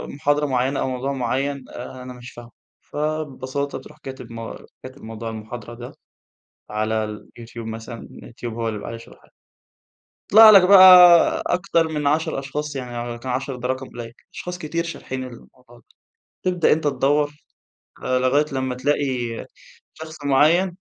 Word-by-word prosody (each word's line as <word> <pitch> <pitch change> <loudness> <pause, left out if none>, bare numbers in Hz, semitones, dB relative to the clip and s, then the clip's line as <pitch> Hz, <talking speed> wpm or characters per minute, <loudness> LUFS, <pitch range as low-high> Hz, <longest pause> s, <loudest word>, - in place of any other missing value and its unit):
محاضرة 145 +1 +1
معينة 135 0 0
أو - - -1
موضوع 130 +2 -3
معين 135 +2 -2
آآ، 125 +1 -9
أنا 125 0 -8
مش 125 0 -11
فاهمه. 120 0 -13 0.3
فببساطة 145 -3 -4
تروح 150 +3 -15
كاتب 130 -2 -9
م 115 0 -7 0.3
كاتب 130 +2 -11
موضوع 115 +1 -6
المحاضرة 110 +1 -8
ده، 120 +1 -10 0.8
على 110 +1 -1
اليوتيوب 115 +2 -9
مثلًا 115 +1 -7
اليوتيوب 115 0 -9
هو 115 0 -3
اللي - - -2
بيبقى - - -8
عليه 115 - -6
شرحها. 115 - -17 1.0
يطلع 220 +2 +10
لك 200 -3 +8
بقى 195 -2 +9 0.6
أكتر 175 -3 +1
من 150 -2 -2
10 155 0 0
أشخاص 145 +2 -5
يعني 120 -2 -5
يمكن 120 +2 -8
10 130 +1 -3
ده 125 0 -4
رقم 130 +1 -3
قليل. 120 -1 -9 0.2
أشخاص 180 -1 -6
كتير 170 0 -3
شارحين 130 -6 -6
الموضوع 125 0 -14
ده. - - -22 0.6
تبدأ 180 -3 +3
أنت 160 +2 -2
تدوَّر 145 +2 +1 0.7
لغاية 130 +3 +2
لما 130 -1 -2
تلاقي 145 +3 0 0.9
شخص 160 0 -10
معيَّن 155 +6 +3
130 Hz, 150 wpm, -22 LUFS, 120-150 Hz, 1.0 s, يطلع